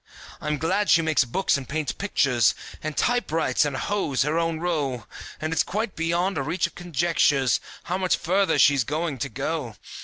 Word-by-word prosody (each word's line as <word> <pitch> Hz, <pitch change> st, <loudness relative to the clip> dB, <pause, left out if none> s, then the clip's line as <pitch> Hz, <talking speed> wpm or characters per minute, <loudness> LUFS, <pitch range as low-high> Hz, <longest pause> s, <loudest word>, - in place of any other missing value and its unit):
I'm 150 Hz, 0 st, -1 dB
glad 185 Hz, +8 st, 0 dB
she 165 Hz, -, +5 dB
makes 155 Hz, -4 st, +2 dB
books 165 Hz, +7 st, +1 dB
and 135 Hz, -3 st, -8 dB
paints 155 Hz, -1 st, -1 dB
pictures, 130 Hz, -, +2 dB, 0.3 s
And 155 Hz, -1 st, -5 dB
typewrites 165 Hz, -, +1 dB
and 140 Hz, -2 st, -2 dB
hoes 170 Hz, -8 st, 0 dB
her 150 Hz, +4 st, 0 dB
own 165 Hz, -1 st, -1 dB
row, 145 Hz, -9 st, -2 dB, 0.3 s
And 155 Hz, +1 st, -2 dB
it's -, -, +3 dB
quite 210 Hz, +1 st, -3 dB
beyond 170 Hz, +2 st, 0 dB
reach 175 Hz, +7 st, 0 dB
of -, -, -5 dB
conjectures 160 Hz, -6 st, +1 dB, 0.2 s
How 180 Hz, +2 st, -2 dB
much 185 Hz, -1 st, +2 dB
further 190 Hz, 0 st, +1 dB
she's 140 Hz, -3 st, +5 dB
going 150 Hz, +1 st, -3 dB
to 135 Hz, -, -2 dB
go. 135 Hz, -1 st, -3 dB
160 Hz, 175 wpm, -25 LUFS, 140-175 Hz, 0.3 s, she